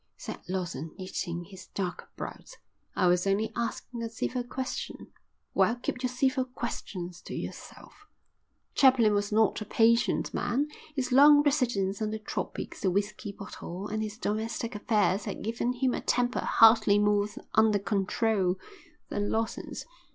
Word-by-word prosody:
said - - -7
Lawson, 170 -5 -3
knitting 175 -2 -4
his 190 +1 -12
dark 185 -3 -3
brows. - - -8 0.4
"I - - +2
was 180 +1 +3
only 210 +3 +1
asking 235 0 -3
a 230 - -3
civil 245 +2 -2
question." 255 +2 -5 0.4
"Well, 230 - +3
keep 250 +1 -4
your 255 - 0
civil 260 +1 +1
questions 185 -8 -6
to - - -7
yourself." 415 - -9 0.7
Chaplin 255 -6 +5
was 205 0 0
not 220 0 +3
a - - -4
patient 230 +2 +2
man; 285 +5 0 0.3
his 260 -2 -1
long 290 +3 +8
residence 235 -9 +1
in 215 - 0
the 220 - -3
tropics, 215 - -5
the 190 - +2
whisky 205 +2 -2
bottle, 200 -1 -7
and 215 +1 -2
his 215 0 -4
domestic 225 +1 -2
affairs 210 -1 +1
had 205 - -5
given 230 +3 -1
him 250 0 +1
a - - -2
temper 245 0 +1
hardly 220 -2 +6
more 205 0 +3 0.3
under 220 -1 +5
control 200 -1 +1 0.5
than 205 0 -1
Lawson's. 225 0 -3
220 Hz, 150 wpm, -29 LUFS, 200-245 Hz, 0.7 s, long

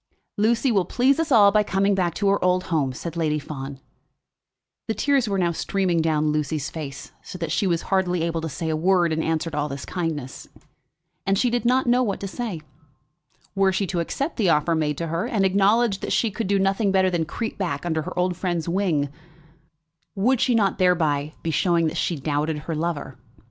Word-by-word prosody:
"Lucy 235 +5 +2
will 195 -4 +3
please 265 - +2
us 325 -3 -1
all 205 -5 +7
by 210 +1 +4
coming 195 0 +1
back 180 -4 0
to 200 - 0
her 200 0 +2
old 180 0 +2
home," 140 -5 +1
said 165 +6 -7
Lady 155 -2 0
Fawn. 140 -2 -7 1.1
The 220 - -1
tears 275 -5 +1
were 200 - 0
now 175 -2 +1
streaming 180 0 0
down 155 -1 +1
Lucy's 150 -1 -2
face, 140 -4 -7
so - - -9
that 165 -3 -4
she 195 - +1
was 170 -2 0
hardly 180 -3 0
able 165 -1 -1
to 160 - -4
say 160 +2 -4
a 160 - 0
word 175 0 +2
in 160 - -1
answer 160 +1 -1
to 150 - -5
all 150 +1 -1
this 140 0 -6
kindness. 155 -7 -4 0.8
And 195 0 +2
she 245 +3 +2
did 240 0 -1
not 255 +2 +3
know 245 +1 +3
what 205 -6 0
word - - -19
to 200 - -3
say. 215 -8 -4 0.9
Were 195 -1 +3
she 190 +1 0
to 180 -1 -2
accept 275 - -3
the 205 -7 +2
offer 165 +1 +2
made 150 -2 0
to 170 - -2
her, 165 +7 -2
and 210 -5 +1
acknowledge 200 +2 +3
that - - -4
she 225 - +1
could 225 +1 -3
do 200 +1 +2
nothing 195 +1 +1
better 190 -1 +3
than 170 -2 0
creep 225 +7 -5
back 170 -6 -2
under 160 -2 0
her 150 - -7
old 180 0 +1
friend's 175 -2 -2
wing, 170 -5 +1 1.1
would 235 +5 +2
she 245 - +3
not 200 -4 +1
thereby 155 -5 +1
be 165 - -1
showing 170 0 +2
that 155 - -1
she 175 - 0
doubted 150 +2 -1
her 165 - -4
lover? 155 -4 -3
180 Hz, 215 wpm, -23 LUFS, 160-200 Hz, 1.1 s, all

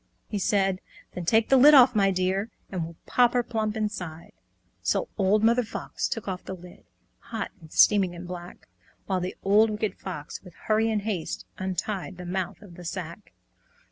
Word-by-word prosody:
He 210 - -3
said, 195 -1 +1 0.3
"Then 180 - -5
take 225 +5 +3
the 270 - +6
lid 290 +4 +8
off, 255 -2 +8
my 200 -3 +3
dear, 190 +3 0 0.2
And 180 -3 -2
we'll 165 +1 -7
pop 245 -1 +3
her 245 -1 +2
plump 220 -2 -2
inside!" 180 -7 -4 0.5
So - - 0
Old 205 +2 +2
Mother 235 +2 +4
Fox 220 - -4
took 225 -4 -4
off 185 -1 -4
the 190 - -6
lid, 180 0 -14 0.3
Hot 225 -3 -5
and 160 -1 -14
steaming 195 -4 +4
and 175 +1 -8
black, 175 -1 -9 0.4
While 190 -2 0
the 180 +1 -4
Wicked 210 +2 +3
Old - - -34
Fox, 165 -6 -7
with 180 -3 -15
hurry 220 +1 +1
and 215 -2 0
haste, 200 -7 -3
Untied 190 0 -3
the 180 - -8
mouth 185 +2 -3
of 190 -4 -13
the 180 - -9
sack. 170 +2 -6
195 Hz, 185 wpm, -26 LUFS, 180-220 Hz, 0.5 s, lid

